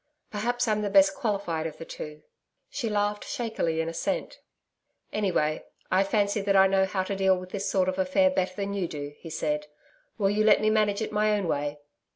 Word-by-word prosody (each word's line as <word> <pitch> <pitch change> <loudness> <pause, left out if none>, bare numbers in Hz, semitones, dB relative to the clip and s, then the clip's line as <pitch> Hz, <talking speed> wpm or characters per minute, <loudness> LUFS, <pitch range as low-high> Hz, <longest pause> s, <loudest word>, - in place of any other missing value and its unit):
Perhaps 240 +3 -1
I'm 215 -1 +1
the 205 - -1
best 195 -1 +6
qualified 195 - -2
of 155 - -9
the 165 - -8
two....' 150 -1 -8 0.5
She 240 -6 -2
laughed 205 0 0
shakily 220 -9 -2
in 160 - -3
assent. 165 - -3 0.7
'Anyway, 175 -7 0 0.3
I 185 +1 +4
fancy 205 +1 +1
that 195 0 +1
I 190 0 +7
know 190 0 +3
how 190 0 -1
to 195 +1 -3
deal 190 -1 +3
with 185 0 -9
this 200 -1 -2
sort 185 -2 +2
of 185 0 -1
affair 235 +10 +3
better 185 -6 -1
than 200 -1 -3
you 195 -3 -1
do,' 145 -2 -6
he 165 - -9
said. 150 -1 -2 0.5
'Will 195 -2 +2
you 210 +1 +2
let 215 -1 +6
me 215 0 +2
manage 215 -1 +2
it - - -4
my 215 0 +2
own 195 -3 -2
way?' 145 -1 -1
195 Hz, 205 wpm, -27 LUFS, 175-210 Hz, 0.7 s, I